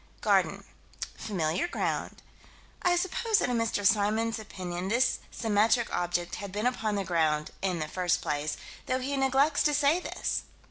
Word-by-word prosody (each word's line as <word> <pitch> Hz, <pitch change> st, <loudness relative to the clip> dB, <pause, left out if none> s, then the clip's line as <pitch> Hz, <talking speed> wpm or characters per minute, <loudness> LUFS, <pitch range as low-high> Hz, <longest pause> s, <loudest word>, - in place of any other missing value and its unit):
Garden -, -, +2 dB, 0.5 s
familiar 180 Hz, -, -1 dB
ground -, -, -3 dB, 0.6 s
I 355 Hz, -1 st, +3 dB
suppose 380 Hz, +5 st, +1 dB
that 305 Hz, -, +1 dB
in 245 Hz, -, +1 dB
Mr. 220 Hz, -3 st, 0 dB
Symons' 220 Hz, +3 st, +2 dB
opinion 180 Hz, -3 st, -5 dB
this 235 Hz, +6 st, +2 dB
symmetric 225 Hz, +1 st, +2 dB
object 175 Hz, 0 st, -1 dB
had 200 Hz, -1 st, -6 dB
been 210 Hz, +4 st, -2 dB
upon 220 Hz, -4 st, 0 dB
the 200 Hz, -, 0 dB
ground 155 Hz, -4 st, +1 dB
"in 185 Hz, -2 st, 0 dB
the 155 Hz, -2 st, -3 dB
first 180 Hz, +2 st, +1 dB
place," 145 Hz, 0 st, -2 dB, 0.3 s
though 255 Hz, -, +1 dB
he 265 Hz, +2 st, -2 dB
neglects 270 Hz, +2 st, +3 dB
to 295 Hz, -1 st, +3 dB
say 295 Hz, +4 st, +3 dB
this. -, -, -2 dB
215 Hz, 155 wpm, -29 LUFS, 180-260 Hz, 0.6 s, I